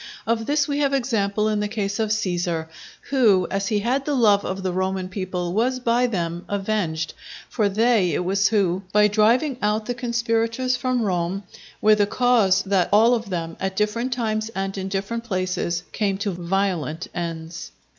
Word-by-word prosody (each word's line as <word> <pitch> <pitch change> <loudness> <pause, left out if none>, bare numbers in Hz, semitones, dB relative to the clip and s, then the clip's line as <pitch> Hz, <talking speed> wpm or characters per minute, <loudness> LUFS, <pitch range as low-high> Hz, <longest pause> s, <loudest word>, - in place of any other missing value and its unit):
Of 225 0 -1
this 295 0 +2
we 285 0 -1
have 280 -1 +2
example 215 -5 0
in 215 -1 0
the 210 - 0
case 205 -2 -3
of 220 -1 0
Cæsar, 175 -6 -1 0.5
who 215 -9 +4
as 195 0 -1
he 210 - +1
had 255 +5 0
the 290 0 -1
love 210 -5 +4
of 190 +1 -4
the 185 - 0
Roman 185 0 -1
people 185 -2 -3
was 250 +5 +1
by 245 0 +2
them 175 -5 -3
avenged; 195 -6 -1 0.4
for 215 -4 +1
they 210 -5 +2
it 180 - -1
was 195 +2 +2
who, 190 -4 +1
by 210 +1 +5
driving 230 +6 +2
out 210 +1 0
the 245 - -2
conspirators 235 +1 0
from 250 -1 0
Rome, 185 0 -1 0.4
were 215 0 +6
the 205 -1 +3
cause 215 -5 +3
that 190 -2 +1
all 225 +4 +5
of 225 -3 -2
them, 165 -3 -3
at 190 0 -2
different 220 +5 -1
times 220 -3 -1
and 195 0 -2
in 190 -1 -4
different 200 +4 -3
places, 185 -4 -2
came 200 -3 -1
to 200 0 -2
violent 180 -2 -2
ends. 165 -1 -5
205 Hz, 180 wpm, -23 LUFS, 185-230 Hz, 0.5 s, were